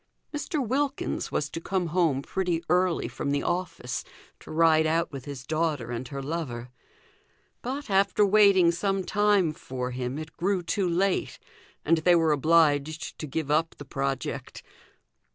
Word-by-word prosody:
Mr. 295 -3 -2
Wilkins 275 +3 -1
was 150 - 0
to 165 - -5
come 185 +1 -1
home 160 -7 +2
pretty 175 -2 -1
early 180 -1 +2
from - - -4
the 140 0 0
office 175 -8 -3 0.4
to - - -15
ride 160 0 +4
out 165 +2 +1
with 135 -3 -7
his 140 -3 -7
daughter 155 -7 -1
and 120 +1 -4
her 140 0 -6
lover; 130 -6 -4 0.9
but, 275 +4 -4
after 200 0 +3
waiting 200 -4 +5
some 195 +2 -1
time 205 -4 +2
for 130 -3 -5
him, 125 +2 -3
it 155 0 -8
grew 185 +1 0
too 185 +2 0
late, 185 +3 0 0.5
and 165 +2 +4
they 175 +2 +4
were 165 -2 +3
obliged 155 0 +2
to 155 - -5
give 145 +1 -3
up 160 +2 +1
the 145 - -10
project. 135 0 -4
165 Hz, 155 wpm, -27 LUFS, 145-190 Hz, 0.9 s, waiting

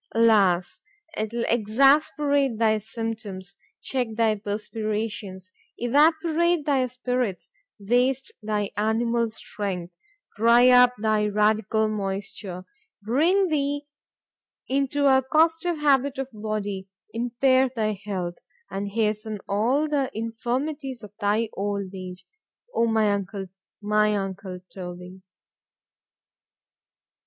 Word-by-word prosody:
——Alas! 200 -6 +3 0.3
'twill 225 +2 -2
exasperate 275 +3 +3
thy 220 -1 +3
symptoms,—check 220 +2 -5
thy 225 -1 +3
perspirations—evaporate 225 - -1
thy 270 -4 +2
spirits—waste 250 +1 -2
thy 210 -2 -2
animal 230 +2 +1
strength, 190 -5 -5 0.4
dry 235 +3 +6
up 250 0 +7
thy 215 0 +1
radical 215 +1 +2
moisture, 195 -2 -4 0.4
bring 335 - +2
thee 290 -1 -1 0.8
into 280 +2 0
a 265 -1 +5
costive 325 +2 +3
habit 280 -2 +2
of 270 -1 -2
body,——impair 215 +5 -1
thy 215 -2 0
health,——and 195 +1 -6
hasten 215 -1 -1
all 245 +9 +1
the 280 -3 0
infirmities 250 +3 -3
of 210 - -11
thy 215 +2 +1
old 200 -1 -3
age.—O 210 - -5
my 220 -2 +2
uncle! 195 0 -4 0.4
my 210 0 +2
uncle 195 -1 -5 0.2
_Toby. 180 0 -8
220 Hz, 90 wpm, -25 LUFS, 205-260 Hz, 0.8 s, up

